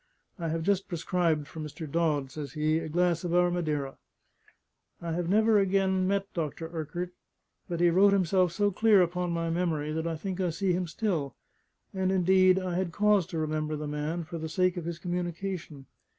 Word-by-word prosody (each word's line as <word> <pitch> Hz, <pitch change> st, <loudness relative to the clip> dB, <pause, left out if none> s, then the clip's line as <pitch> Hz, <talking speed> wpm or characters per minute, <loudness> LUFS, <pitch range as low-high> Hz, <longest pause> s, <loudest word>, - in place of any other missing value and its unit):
"I 165 Hz, -, -2 dB
have 165 Hz, 0 st, -2 dB
just 195 Hz, +1 st, +1 dB
prescribed 165 Hz, -3 st, 0 dB
for 160 Hz, -, -10 dB
Mr. 155 Hz, +1 st, -6 dB
Dodd," 150 Hz, -3 st, 0 dB
says 145 Hz, -3 st, -7 dB
he, 155 Hz, +1 st, +1 dB
"a 165 Hz, -1 st, -5 dB
glass 175 Hz, +1 st, +1 dB
of 175 Hz, -1 st, -1 dB
our 175 Hz, 0 st, +4 dB
Madeira." 150 Hz, -6 st, -2 dB, 1.0 s
I 170 Hz, -1 st, -4 dB
have 170 Hz, +1 st, -2 dB
never 215 Hz, +1 st, +4 dB
again 190 Hz, -1 st, +2 dB
met 200 Hz, 0 st, -1 dB
Dr. 165 Hz, -1 st, -3 dB
Urquart: 170 Hz, +3 st, -4 dB, 0.6 s
but 170 Hz, -1 st, -2 dB
he 175 Hz, -1 st, +5 dB
wrote 195 Hz, +3 st, +5 dB
himself 185 Hz, -2 st, +2 dB
so 205 Hz, +3 st, +1 dB
clear 205 Hz, -1 st, +5 dB
upon 180 Hz, +1 st, -2 dB
my 165 Hz, -1 st, -1 dB
memory 165 Hz, -3 st, -1 dB
that 160 Hz, +1 st, -2 dB
I 165 Hz, -, -2 dB
think 190 Hz, +3 st, -4 dB
I 180 Hz, -, +1 dB
see 180 Hz, +3 st, 0 dB
him 180 Hz, 0 st, -1 dB
still. 165 Hz, -, -2 dB, 0.6 s
And 190 Hz, -1 st, 0 dB
indeed 185 Hz, 0 st, +4 dB
I 185 Hz, -2 st, -2 dB
had 180 Hz, -1 st, -1 dB
cause 205 Hz, -1 st, +3 dB
to 180 Hz, -3 st, -5 dB
remember 155 Hz, 0 st, -1 dB
the 150 Hz, 0 st, -5 dB
man 150 Hz, +3 st, -3 dB
for 165 Hz, +1 st, -7 dB
the 160 Hz, 0 st, -4 dB
sake 185 Hz, +2 st, +1 dB
of 175 Hz, -3 st, -5 dB
his 170 Hz, -1 st, -4 dB
communication. 175 Hz, -4 st, -4 dB
175 Hz, 195 wpm, -29 LUFS, 160-185 Hz, 1.0 s, he